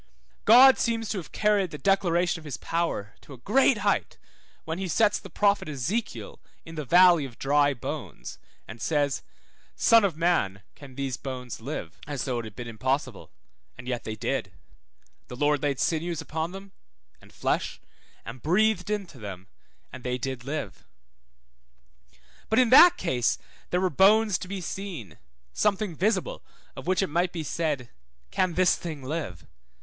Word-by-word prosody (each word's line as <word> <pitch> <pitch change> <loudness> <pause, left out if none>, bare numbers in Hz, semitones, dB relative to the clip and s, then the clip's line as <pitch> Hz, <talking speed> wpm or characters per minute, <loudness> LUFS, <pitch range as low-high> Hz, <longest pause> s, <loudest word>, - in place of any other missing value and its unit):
God 255 +4 +8
seems 225 -2 -1
to 200 - -2
have 165 - -10
carried 205 -3 +2
the 150 - -7
declaration 175 0 +1
of - - -14
his 145 -5 -6
power 165 -11 -2
to 140 - -13
a - - -11
great 245 - +3
height, 200 - 0 0.5
when 160 +2 -4
he 190 - -2
sets 205 +5 +2
the 195 - -11
prophet 200 -2 +1
Ezekiel 160 - -3 0.3
in 165 - -10
the 155 -2 -4
valley 175 +1 +6
of 130 -4 -8
dry 145 0 +2
bones, 90 - -7 0.3
and 110 +1 -10
says, 145 -3 0 0.5
Son 230 -1 +5
of 180 -6 0
man, 130 - +1
can 135 -3 -13
these 135 -2 -3
bones 125 -4 -7
live? 110 - -6
as 145 -3 -3
though 125 -3 -1
it 115 - -6
had 110 -2 -10
been 120 -1 -7
impossible, 130 0 -2 0.5
and 125 0 -10
yet 125 -2 -3
they 110 - -5
did; 110 - -2 0.8
the 125 - -8
Lord 145 +1 +1
laid 140 -3 -1
sinews 165 0 -1
upon 160 +2 -3
them, 195 +1 -10 0.5
and - - -18
flesh, - - -2 0.5
and 120 +2 -8
breathed 190 - +2
into 200 -10 -4
them, 95 -3 -8 0.5
and 130 - -9
they 125 0 -1
did 125 -1 -5
live. 140 -8 -5 1.7
But 220 - +1
in 250 -1 +4
that 345 +6 +9
case 125 -2 0 0.3
there 180 - +1
were 185 -1 +1
bones 205 +4 +4
to - - -7
be 195 0 -5
seen, 175 - -7 0.3
something 205 -3 0
visible, 220 - 0 0.3
of - - -9
which 185 +1 +2
it - - 0
might 175 +4 0
be 165 -3 -4
said, 145 -6 -2 0.4
Can 185 -3 0
this 185 -1 +4
thing 155 -5 -7
live? 130 - -5
160 Hz, 165 wpm, -26 LUFS, 130-195 Hz, 1.7 s, that